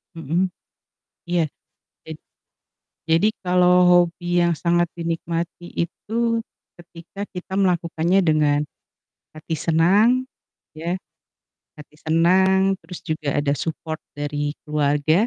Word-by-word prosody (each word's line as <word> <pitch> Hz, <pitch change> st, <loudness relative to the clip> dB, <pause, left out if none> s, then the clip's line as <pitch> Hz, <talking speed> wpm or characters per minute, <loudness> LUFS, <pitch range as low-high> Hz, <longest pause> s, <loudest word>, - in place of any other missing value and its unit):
Mhm. 165 Hz, +4 st, -1 dB, 0.8 s
Iya, 175 Hz, -1 st, +2 dB, 0.6 s
jad -, -, -8 dB, 0.9 s
jadi 165 Hz, +6 st, +4 dB
kalau 180 Hz, -1 st, +3 dB, 0.2 s
hobi 175 Hz, 0 st, +3 dB, 0.2 s
yang 170 Hz, 0 st, +3 dB
sangat 175 Hz, 0 st, +3 dB
dinikmati 170 Hz, +1 st, -3 dB, 0.2 s
itu, 175 Hz, +5 st, -6 dB, 0.6 s
ketika 175 Hz, +3 st, -9 dB
kita 185 Hz, 0 st, -7 dB
melakukannya 175 Hz, -1 st, +1 dB
dengan 155 Hz, -4 st, +2 dB, 0.8 s
hati 155 Hz, +1 st, -5 dB
senang, 200 Hz, +11 st, +3 dB, 0.5 s
ya, 170 Hz, +4 st, -3 dB, 0.8 s
hati 150 Hz, 0 st, -14 dB
senang 190 Hz, +4 st, +3 dB
terus 175 Hz, +2 st, -9 dB
juga 155 Hz, -4 st, -2 dB
ada 145 Hz, -1 st, +1 dB
support 160 Hz, +1 st, -4 dB, 0.2 s
dari 145 Hz, 0 st, -3 dB
keluarga. 150 Hz, 0 st, +1 dB
170 Hz, 100 wpm, -22 LUFS, 155-180 Hz, 0.9 s, jadi